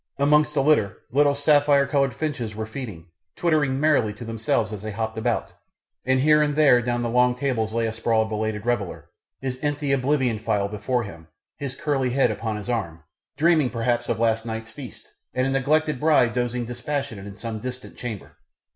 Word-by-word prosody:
Amongst 150 +2 +3
the 135 - +3
litter 135 -10 +2
little 145 +2 +3
sapphire 145 -1 +4
coloured 140 -1 +1
finches 125 -9 -3
were 110 0 -3
feeding, 110 -8 -8 0.3
twittering 150 -6 +1
merrily 140 -8 +2
to 120 - -8
themselves 110 -1 -1
as 105 - -6
they 110 - -5
hopped 110 +1 -3
about, 115 +1 -1 0.5
and 130 0 +3
here 150 +1 +5
and 145 -1 +1
there 140 -5 +5
down 120 0 -1
the - - 0
long 125 +1 +3
tables 125 -5 -1
lay 115 0 0
asprawl 110 0 +1
a - - -4
belated 110 -1 -3
reveller, 120 -6 -2 0.3
his 130 -1 -4
empty 145 -1 -1
oblivion 130 -4 +1
phial 105 -2 0
before 110 +4 -1
him, 85 -6 -10 0.3
his 135 -2 -5
curly 140 -5 0
head 135 +2 +2
upon 110 -2 -3
his 105 - -8
arms, 95 -10 -3 0.4
dreaming 160 -4 +3
perhaps 120 0 -1
of 115 - 0
last 115 -1 +2
night's 110 -1 -6
feast 125 +1 -10 0.3
and 130 0 +1
a 135 - 0
neglected 150 +1 +1
bride 150 -6 +4
dozing 120 -1 -1
dispassionate 120 -3 -4
in 100 - -9
some 110 0 -5
distant 125 +2 -7
chamber. 115 -5 -7
125 Hz, 185 wpm, -24 LUFS, 110-140 Hz, 0.5 s, here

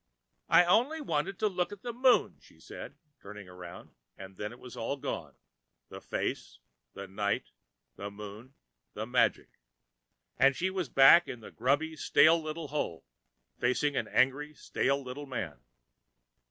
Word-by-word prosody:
"I 175 - +7
only 245 - +3
wanted 185 - -2
to 215 - +1
look 180 -2 -1
at 205 -1 -10
the 240 -1 -4
Moon," 250 +1 +3
she - - -21
said, - - -10 0.2
turning 105 -1 -10
around, 90 -1 -11 0.3
and 95 0 -10
then 105 +2 -5
it 120 - -12
was 125 -1 -11
all 125 +5 -3
gone - - -5 0.5
the - - -9
face, - - -4 0.4
the 100 - -8
night, 100 +1 -2 0.5
the 100 - -5
Moon, 105 +5 -10 0.4
the - - -3
magic - - 0 0.8
and 135 0 +5
she 185 +5 -1
was 185 -7 -3
back 135 +6 +7
in 120 - -7
the - - -11
grubby, 145 +7 0
stale 160 +1 +5
little 155 -1 -5
hole, 140 - -3 0.5
facing 140 +4 +1
an - - -1
angry, 145 +4 +1
stale 140 0 0
little 135 +3 -7
man. 100 - -5
140 Hz, 155 wpm, -30 LUFS, 105-170 Hz, 0.8 s, I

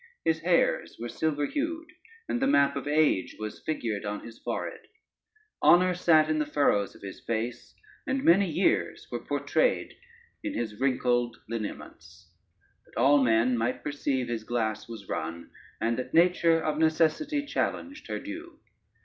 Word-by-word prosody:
His 160 0 +2
hairs 170 +1 +1
were 120 +1 -4
silver 145 +2 -1
hued, 320 - -3 0.4
and 245 - -1
the 270 - +3
map 140 - +4
of - - -4
age 150 -10 +2
was 110 0 -6
figured 115 -10 -2
on 105 0 -4
his 115 0 -11
forehead: - - -5 0.7
honor 180 +1 +6
sat 160 -3 +4
in 155 0 0
the 150 - +1
furrows 140 -9 +1
of - - -16
his 95 -1 -7
face, 115 +1 -4 0.3
and 265 0 0
many 185 +3 +5
years 165 +5 +1
were - - -2
portrayed - - 0 0.5
in 305 -2 -3
his 110 -3 -4
wrinkled 125 -2 +1
lineaments, 85 -7 -7 0.6
that - - -7
all 140 +3 +5
men 120 0 +3
might 120 +2 -1
perceive 140 -3 -1
his 115 -2 -3
glass 110 -1 -2
was 110 -4 -9
run, 85 +1 -5 0.3
and 115 +2 0
that 130 +3 -5
nature 170 -1 +4
of 155 -1 -1
necessity 170 - +2
challenged 285 0 -3
her - - -3
due. 325 +1 -8
145 Hz, 155 wpm, -28 LUFS, 115-170 Hz, 0.7 s, honor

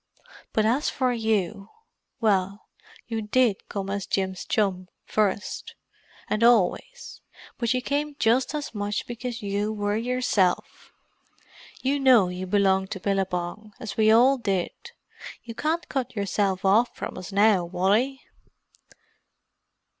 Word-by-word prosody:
But 215 - +1
as 250 +7 +2
for 255 -2 0
you—well 210 - -2 0.4
you 225 -1 -3
did 220 -1 +1
come 195 -1 -4
as 200 -1 -3
Jim's 190 -1 -2
chum 190 -3 0 0.2
first—and 215 +1 -3
always; 240 - +1 0.4
but 235 -1 0
you 255 - -1
came 290 +2 -2
just 250 +4 +2
as 295 -4 -4
much 205 -1 -2
because 240 -1 -6
you 205 +1 -1
were 205 -1 -1
yourself. 230 -5 0 0.9
You 275 +2 +1
know 250 -9 +5
you 180 +1 -5
belonged 190 -1 +2
to 190 - -7
Billabong, 195 +1 -2
as 220 - -6
we 215 -1 +4
all 255 +4 +5
did. 195 -6 -1 0.7
You 230 - -8
can't 320 +7 -1
cut 255 -3 -3
yourself 200 -1 -1
off 220 +5 +3
from - - -6
us 185 +1 -8
now, 200 -2 +4
Wally." 200 +10 0
215 Hz, 125 wpm, -25 LUFS, 195-245 Hz, 0.9 s, know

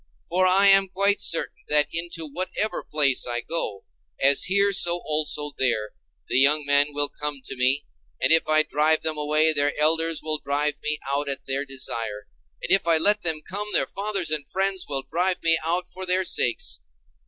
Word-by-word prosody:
For 185 +2 +2
I 190 +2 +4
am 195 0 +5
quite 200 +2 0
sure 165 - +1 0.2
that 150 -1 +3
into 165 0 -3
whatever 185 +7 -4
place 140 -5 +1
I 120 0 -2
go, 110 -10 -5 0.3
as 140 +1 +3
here 200 +1 +2
so 175 -2 +1
also 150 -1 0
there, 110 -5 0 0.4
the - - +1
young 145 +2 +3
men 145 +1 +3
will 145 0 0
come 150 0 -5
to - - -6
me; 130 +3 +1 0.3
and - - +1
if 160 - +2
I 155 0 +4
drive 155 +1 +1
them 160 -1 -1
away, 155 +1 +2
their 145 0 0
elders 160 +1 +1
will 155 -1 -2
drive 145 +1 -1
me 150 0 -1
out 140 +1 -1
at 135 - -2
their 135 +1 -1
desire: 115 -6 -5 0.4
and - - -4
if 195 -2 +3
I 165 -1 +4
let 205 +6 +3
them 160 -3 -1
come, 205 +3 -4
their - - +2
fathers 195 -5 -3
and 150 -2 -2
friends 190 -1 -2
will 135 -2 -2
drive 180 +6 -1
me 165 -1 +3
out 175 +3 -1
for 190 0 -6
their 185 +1 0
sakes. 75 - 0
155 Hz, 190 wpm, -23 LUFS, 145-180 Hz, 0.4 s, am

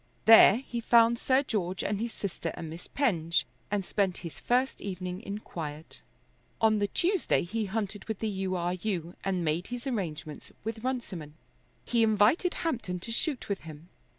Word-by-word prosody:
There 225 -2 +9
he 240 -1 -4
found 230 0 +5
Sir 265 +1 +3
George 190 -8 -2
and 205 0 -1
his 235 0 -2
sister 180 -5 -4
and 160 -2 -6
Miss 165 +2 -9
Penge, 170 - +1 0.2
and 200 -2 -1
spent 195 -2 0
his 160 -5 -7
first 255 +2 +1
evening 185 -1 -4
in 200 -3 -5
quiet. 155 -6 -7 0.6
On 220 -1 +4
the 205 - +1
Tuesday 360 - +1
he 215 +5 -2
hunted 205 0 -3
with 220 -2 -3
the 220 - -2
U. 190 -2 -2
R. 175 0 0
U., 180 -3 -3
and 185 -3 0
made 160 +4 0
his 245 +1 -6
arrangements 155 - -4
with 220 +1 -4
Runciman. 195 - -4 0.5
He 235 -1 +2
invited 225 - +3
Hampton 225 - -1
to 230 - -6
shoot 270 +3 -1
with 200 -1 -1
him. 160 +1 -11
200 Hz, 175 wpm, -29 LUFS, 175-230 Hz, 0.6 s, There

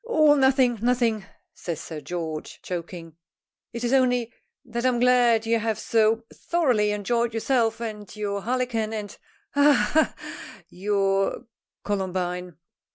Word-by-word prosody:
"Oh, 310 -11 +4
nothing, 265 -4 +3
nothing," 235 -4 +1 0.3
says 170 -3 -5
Sir 160 -2 -7
George, 160 -1 -5
choking; 170 -2 -6 0.5
"it 235 0 -6
is 240 +2 0
only 250 -3 +2 0.3
that 235 0 -4
I'm 255 -2 +2
glad 240 -2 +4
you 230 0 +2
have 220 0 -1
so 225 0 +2
thoroughly 255 -12 +1
enjoyed 230 +3 -1
yourself 230 -1 +1
and 215 -4 -6
your 200 -1 -3
harlequin, 235 -2 -1
and 210 -2 -5 0.4
ha, 285 +1 +5 0.2
ha, 315 +1 +3
ha, - - -11
your 195 +3 0 0.4
Columbine. 180 -3 -3
225 Hz, 130 wpm, -25 LUFS, 195-245 Hz, 0.5 s, ha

